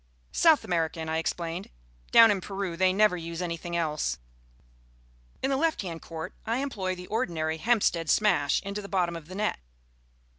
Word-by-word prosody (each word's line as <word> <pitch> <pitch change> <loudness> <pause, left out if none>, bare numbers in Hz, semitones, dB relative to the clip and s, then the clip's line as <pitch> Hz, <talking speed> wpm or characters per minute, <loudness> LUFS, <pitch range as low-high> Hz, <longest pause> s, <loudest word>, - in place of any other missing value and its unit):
"South 320 -5 +5
American," 165 -4 -1
I 160 0 0
explained. 170 +2 -3 0.4
"Down 230 -1 +8
in 195 -2 0
Peru 195 -3 -4
they 185 +1 +3
never 210 0 +4
use 165 0 -6
anything 170 -1 -4
else." 150 - -1 1.3
In 270 - +1
the - - +2
left 320 -5 +1
hand 165 -3 -6
court 165 +2 -7
I 230 +2 -1
employ 205 -9 -2
the 180 0 -9
ordinary 170 -8 -1
Hampstead 170 -4 +1
Smash 155 -9 +3
into 200 +1 -4
the 200 - -9
bottom 175 -3 0
of 165 -2 -8
the 185 - -9
net. 210 - -1
180 Hz, 170 wpm, -28 LUFS, 165-210 Hz, 1.3 s, Down